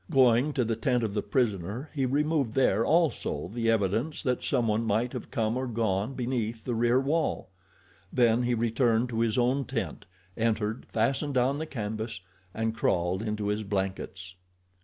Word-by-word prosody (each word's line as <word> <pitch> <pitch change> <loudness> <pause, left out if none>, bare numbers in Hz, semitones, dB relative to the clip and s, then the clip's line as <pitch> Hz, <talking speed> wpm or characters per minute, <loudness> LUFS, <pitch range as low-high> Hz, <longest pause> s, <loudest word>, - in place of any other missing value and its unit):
Going 130 -1 +4
to 125 -4 +1
the 115 0 0
tent 120 +1 +1
of 105 -3 -1
the 105 - 0
prisoner 105 - -1
he 135 -4 0
removed 145 -3 0
there 115 -5 +3
also 160 - +1
the 115 -1 0
evidence 115 - 0
that 125 -4 0
someone 115 -2 +1
might 115 +3 0
have 125 - -6
come 110 0 0
or 130 0 -2
gone 110 +1 -1
beneath 120 -3 -2
the 125 - -2
rear 120 +2 +3
wall. 145 -5 -1 0.6
Then 120 -1 +3
he 120 0 +1
returned 115 +1 +1
to 115 -2 -2
his 115 0 +1
own 125 +3 +2
tent, - - -4 0.3
entered, 110 0 -1
fastened 135 +5 0
down 130 +3 +2
the 160 - -4
canvas, 110 -3 -4 0.3
and 110 +3 -1
crawled 90 -3 0
into 105 -2 -2
his 105 +1 0
blankets. 95 -2 -3
115 Hz, 165 wpm, -28 LUFS, 110-130 Hz, 0.6 s, Going